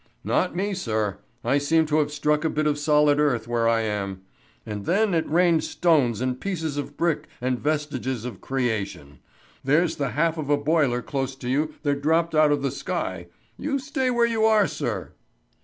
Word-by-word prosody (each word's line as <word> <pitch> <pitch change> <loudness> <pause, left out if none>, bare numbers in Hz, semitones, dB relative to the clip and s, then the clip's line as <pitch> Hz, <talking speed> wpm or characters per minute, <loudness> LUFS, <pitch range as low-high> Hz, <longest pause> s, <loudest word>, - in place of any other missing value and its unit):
"Not - - 0
me, 200 +3 -1
sir. 110 - -2 0.2
I 140 - +2
seem 160 +3 +2
to 155 0 +1
have 150 -1 0
struck 150 +1 +1
a 160 - +1
bit 155 0 -1
of 150 -1 +1
solid 150 0 +3
earth 125 -7 +1
where 115 -1 +1
I 115 -1 +2
am. 100 -3 -3 0.4
And 105 -1 -5
then 200 +3 +2
it 165 -1 0
rained 170 0 +3
stones 135 - +2
and 130 0 -2
pieces 160 -7 -3
of 145 0 -5
brick 170 -3 0
and 125 0 -1
vestiges 140 -5 -2
of 125 - -7
creation. 110 - -3 0.4
There's 155 +5 +2
the 140 -3 -1
half 165 +1 +1
of 145 -2 -4
a 145 - +4
boiler 145 -5 +1
close 135 0 -3
to 125 -2 -6
you 150 +4 0
that 140 -1 0
dropped 165 +3 +2
out 155 -1 +5
of 145 -1 0
the 135 - 0
sky. 110 - -4 0.3
You 280 0 -1
stay 265 -1 -1
where 240 -1 +3
you 225 -2 0
are, 220 -2 +5
sir." - - -4
145 Hz, 190 wpm, -24 LUFS, 125-165 Hz, 0.4 s, out